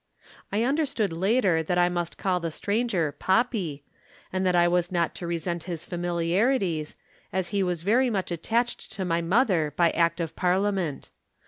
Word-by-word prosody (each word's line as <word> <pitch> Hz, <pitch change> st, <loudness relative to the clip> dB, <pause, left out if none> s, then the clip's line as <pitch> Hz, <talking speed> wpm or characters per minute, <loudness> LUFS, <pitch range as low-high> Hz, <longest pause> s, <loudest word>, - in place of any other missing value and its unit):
I 210 Hz, +3 st, +1 dB
understood 270 Hz, -, 0 dB
later 190 Hz, -1 st, +2 dB
that 175 Hz, +3 st, -1 dB
I 175 Hz, 0 st, +5 dB
must 175 Hz, -1 st, -3 dB
call 185 Hz, -2 st, 0 dB
the 165 Hz, -1 st, -3 dB
stranger 200 Hz, -3 st, 0 dB
'Poppy,' 190 Hz, -, 0 dB, 0.5 s
and 185 Hz, 0 st, 0 dB
that 180 Hz, -, +2 dB
I 175 Hz, 0 st, +5 dB
was 175 Hz, 0 st, +1 dB
not 170 Hz, -2 st, 0 dB
to 175 Hz, -, -6 dB
resent 170 Hz, 0 st, -3 dB
his 170 Hz, -3 st, -5 dB
familiarities, 175 Hz, -, 0 dB, 0.4 s
as 185 Hz, -2 st, -1 dB
he 200 Hz, -2 st, 0 dB
was 180 Hz, -3 st, -1 dB
very 245 Hz, +6 st, +3 dB
much 195 Hz, -5 st, -2 dB
attached 230 Hz, +8 st, -1 dB
to 195 Hz, -3 st, -3 dB
my 170 Hz, -1 st, +1 dB
mother 175 Hz, -, +2 dB
by 170 Hz, 0 st, +3 dB
Act 170 Hz, 0 st, +1 dB
of 165 Hz, -2 st, -3 dB
Parliament. 185 Hz, -4 st, 0 dB
180 Hz, 165 wpm, -26 LUFS, 170-205 Hz, 0.5 s, I